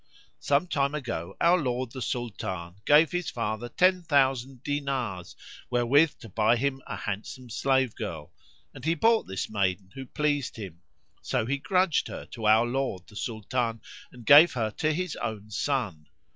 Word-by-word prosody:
Some 145 +4 +2
time 140 -4 0
ago 115 - -5
our 175 +2 +4
lord 125 -2 -2
the 130 - -7
Sultan 95 -8 -4
gave 150 +2 +6
his 175 -2 -2
father 115 0 -3
ten 185 +7 +3
thousand 135 -4 +1
dinars 135 -10 -3 0.3
wherewith 130 +6 +3
to 115 - -10
buy 110 +4 +3
him 135 +2 -1
a - - -4
handsome 115 +5 -6
slave 130 -1 +1
girl, 85 -9 -6 0.4
and - - -12
he 165 +2 +1
bought 225 +7 +3
this 95 - -3
maiden 95 -2 -1
who 135 -1 -8
pleased 145 -2 -1
him; 95 -6 -9 0.4
so - - -1
he 140 +4 -1
grudged 180 0 +1
her - - -7
to 115 -4 -3
our 110 +2 +6
lord 120 -7 -2
the 105 - -17
Sultan 115 +2 -2 0.3
and 120 -2 -13
gave 155 +7 +8
her 110 -3 -1
to 155 +8 0
his 180 +1 -2
own 110 -2 -5
son. 105 - -2
125 Hz, 165 wpm, -27 LUFS, 110-145 Hz, 0.4 s, gave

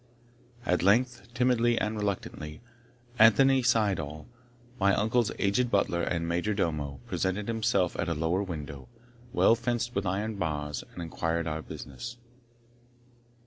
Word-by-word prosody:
At 90 -5 +2
length, 120 +6 +2
timidly 120 -2 +3
and 110 +1 -1
reluctantly, 95 -7 -4 0.6
Anthony 130 +5 +6
Syddall, 100 -11 0 0.5
my 100 0 +4
uncle's 115 +1 +1
aged 105 +5 +1
butler 90 -5 +1
and 85 -1 -1
major 90 +5 0
domo, 75 -7 -2
presented 95 +2 -2
himself 110 -6 +1
at 85 - 0
a 85 - 0
lower 80 +5 0
window, 75 - -6 0.4
well 120 - +5
fenced 120 0 -1
with 100 0 -1
iron 105 +3 -2
bars, 75 -5 -2
and 85 - -6
inquired 85 0 -2
our 80 0 -2
business. 115 - -8
100 Hz, 130 wpm, -29 LUFS, 80-115 Hz, 0.6 s, Anthony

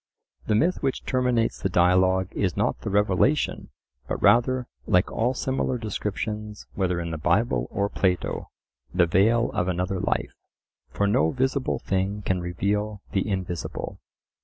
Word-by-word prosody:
The 110 - +2
myth 170 +11 +2
which 135 -2 -2
terminates 125 -3 +1
the 95 - 0
dialogue 95 +1 +3
is 95 -4 -1
not - - 0
the - - -3
revelation, 105 +8 +1 0.4
but - - -2
rather, 125 +2 +4 0.2
like 90 +1 +3
all 125 +3 0
similar 130 0 -1
descriptions, 105 -1 -4
whether 90 -3 0
in 85 -1 -4
the 80 - -4
Bible 95 +10 +1
or 100 0 0
Plato, 95 -3 -1 0.4
the 90 0 +3
veil 110 +7 +3
of 90 - -1
another 90 +1 -1
life. - - -1 0.6
For 100 - 0
no 80 -6 +3
visible 130 - 0
thing 100 +2 -2
can 95 -2 0
reveal 100 +4 -2
the 95 +2 0
invisible. 90 -3 -4
100 Hz, 145 wpm, -25 LUFS, 90-115 Hz, 0.6 s, rather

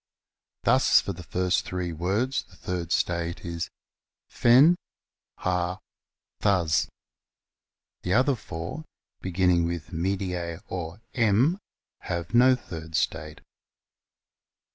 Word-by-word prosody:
Thus, - - +5
for 100 - -3
the 90 - -9
first 90 +3 0
three 90 -2 -3
words 100 - 0
the 90 - -20
third 90 -2 -4
state 85 -1 -1
is 85 -1 -3 0.6
Fen, 135 +9 +6 0.6
Har, 90 0 -1 0.6
Thds. 85 -8 +2 1.1
The 90 +3 0
other 130 +3 +4
four, 90 - -6 0.4
beginning 90 -2 +2
with 85 0 -5
medics 90 0 -2
or 90 +2 -5
m, 120 - +3 0.4
have 85 +3 -4
no 130 +2 +6
third 80 -9 -8
state. 75 0 -2
90 Hz, 100 wpm, -27 LUFS, 85-105 Hz, 1.1 s, Fen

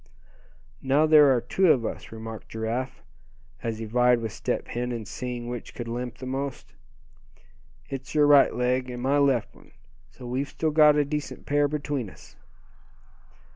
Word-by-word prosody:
"Now 140 +3 +3
there 155 -2 +7
are - - +2
two 175 +9 +3
of 120 -4 +2
us," - - -6
remarked 110 0 -8
Giraffe, 115 +4 -4 0.6
as 115 -2 -3
he 110 - -5
vied 125 +2 +3
with 115 -2 -4
Step - - -3
Hen 125 +1 -3
in 115 -3 -4
seeing 120 +2 -5
which 120 -1 -7
could 120 - -6
limp 120 +1 -5
the 130 - -8
most. 135 +1 -5 1.1
"It's 135 +2 -7
your 150 -1 +5
right 145 -4 +6
leg, 125 +1 0
and 125 -1 -6
my 140 +2 +2
left 135 -6 +1
one; - - -20 0.4
so 125 - -13
we've 130 +4 -2
still 160 -1 -1
got 150 -1 +6
a 150 -1 +2
decent 150 +1 -5
pair 145 0 +2
between 145 -6 -3
us." - - -17
125 Hz, 170 wpm, -26 LUFS, 120-145 Hz, 1.1 s, there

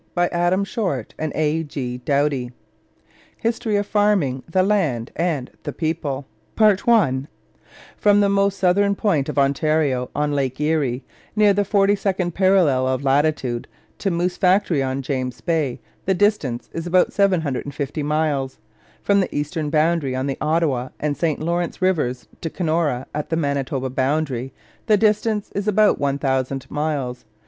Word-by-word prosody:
Adam 175 +2 +2
Shortt 185 - -3
and 155 -1 -2
Arthur 155 +1 +1
G. 130 -5 -4
Doughty, 140 0 0
General - - -19
Editors - - -35
HISTORY 230 -1 0
OF 205 0 +1
FARMING 195 -12 +1
THE 185 +3 +2
LAND 160 - 0
AND 160 -7 -1
THE - - -4
PEOPLE 155 -4 -2 1.7
From 205 -1 +4
the 200 - +4
most 200 0 +2
southern 200 +2 +3
point 175 -11 0
of - - -5
Ontario 140 -2 +1
on 150 0 0
Lake 135 -2 -1
Erie, 150 -5 0 0.3
near 210 -1 +5
the 205 - +2
42nd 195 -3 +1
parallel 180 -9 +3
of 130 +1 -1
latitude, 135 -3 +1 0.3
to 200 - 0
Moose 175 0 -1
Factory 185 -5 +3
on 135 0 -2
James 130 -2 -3
Bay, 155 -8 -1 0.3
the 190 - +2
distance 180 - 0
is 165 +1 -4
about 180 +1 +3
750 150 -6 0
miles. 145 -3 -1 0.5
From 200 0 +3
the 190 - -2
eastern 150 +1 -2
boundary 155 -3 +1
on 130 +1 -1
the 135 -1 -2
Ottawa 150 -5 0
and 150 -1 -1
St 160 -2 -1
Lawrence 170 +2 -2
Rivers 150 -10 0
to 165 - -3
Kenora 155 -7 -1
at 150 0 -4
the 160 - 0
Manitoba 140 -3 -1
boundary, 135 -1 -1 0.4
the 215 -2 +5
distance 210 0 +1
is 200 +1 -3
about 210 0 +3
1000 135 -1 -1
miles. 145 -5 -2
155 Hz, 145 wpm, -21 LUFS, 135-185 Hz, 1.7 s, near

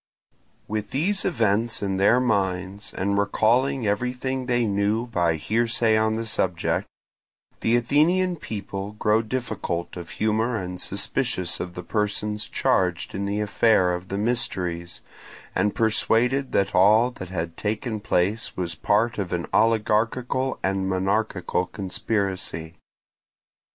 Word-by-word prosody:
With 105 -1 -3
these 190 +9 0
events 115 - +1
in 95 -1 -1
their 100 +6 +5
minds, 100 -4 -1
and 100 +1 0
recalling 120 +5 +2
everything 125 +5 -1
they 120 -2 +2
knew 105 +3 +1
by 85 -8 +1
hearsay 115 +6 +1
on 110 0 +2
the 115 +1 -3
subject, 90 -5 0 0.7
the 115 - +2
Athenian 165 +9 +3
people 100 -5 -5
grow 105 +1 +2
difficult 110 -7 -3
of 85 -2 -7
humour 110 +3 +1
and 90 -2 -5
suspicious 90 -2 -1
of 90 0 -5
the 90 - -6
persons 105 +2 -1
charged 90 -2 0
in 100 +1 -2
the 100 +1 -1
affair 105 -3 +3
of 90 +1 -5
the 100 - -3
mysteries, 90 -7 -2 0.5
and 100 +2 +1
persuaded 115 +4 +2
that 100 0 +1
all 110 +6 +5
that 95 -7 -9
had 85 -2 -4
taken 110 +2 -2
place 105 +1 0
was 90 -2 -2
part 110 +8 +1
of 95 -4 -3
an 85 -1 -1
oligarchical 115 +4 +1
and 95 0 0
monarchical 95 -1 0
conspiracy. 95 -4 -3
105 Hz, 130 wpm, -24 LUFS, 95-115 Hz, 0.7 s, their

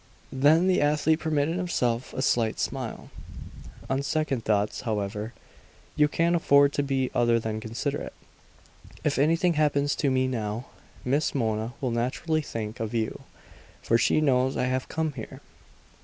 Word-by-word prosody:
Then 150 +6 +4
the 185 -1 +3
athlete 150 +2 +2
permitted 160 +1 0
himself 125 -10 -1
a 130 - -1
slight 115 -5 +1
smile. - - -4 0.8
"On 135 +1 0
second 140 -4 -1
thoughts, 105 -1 0
however, 105 -1 -3 0.6
you 150 - +4
can't 170 +3 +1
afford 140 -3 +4
to - - +1
be 135 -2 -1
other 120 -1 +3
than 110 -1 -3
considerate. 115 +6 -4 0.9
If - - 0
anything 165 +4 +3
happens 145 -2 +2
to 145 - +1
me 130 0 +2
now, 115 -1 -3 0.4
Miss 140 +4 0
Mona 110 -2 -1
will 130 -3 -1
naturally 130 +7 -1
think 110 -6 -6
of 110 +1 -3
you; 110 -1 -2 0.6
for 115 - +3
she 155 - +3
knows 130 -2 +2
I - - +1
have 130 0 -2
come 160 -2 -1
here!" 115 -5 -8
130 Hz, 150 wpm, -26 LUFS, 115-150 Hz, 0.9 s, Then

